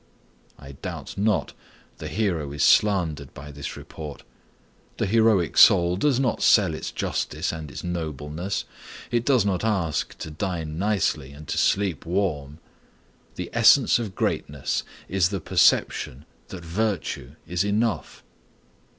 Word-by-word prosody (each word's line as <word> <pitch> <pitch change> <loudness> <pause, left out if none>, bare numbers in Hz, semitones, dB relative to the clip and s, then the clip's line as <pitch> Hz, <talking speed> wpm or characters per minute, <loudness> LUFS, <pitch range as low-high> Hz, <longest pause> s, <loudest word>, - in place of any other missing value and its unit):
I 70 -1 -11
doubt 70 - -7
not 105 0 0 0.5
the - - -5
hero 85 -9 -1
is 70 -1 -1
slandered 85 -9 +2
by 75 +2 -9
this 70 0 -7
report. 75 -3 -9 0.7
The - - 0
heroic 110 -4 +3
soul 90 -2 +7
does 135 +5 +2
not 130 -3 0
sell 95 -7 +5
its 80 - -5
justice - - -2
and 80 -2 -7
its - - -8
nobleness. 85 +2 -4 0.5
It 120 -1 +1
does 130 -7 +3
not 95 -2 0
ask 95 -8 -1
to 80 - -7
dine 80 -2 -4
nicely 95 -9 0
and 75 +1 -12
to - - -2
sleep 95 -4 +1
warm. 80 -6 -2 0.8
The - - -6
essence - - +5
of 105 -5 -5
greatness 70 -2 -1 0.3
is 95 -2 +2
the 100 -1 -3
perception 70 -3 +2 0.2
that 90 -3 -9
virtue 85 - -2
is 90 +1 -1
enough. 105 - -1
90 Hz, 135 wpm, -24 LUFS, 75-100 Hz, 0.8 s, soul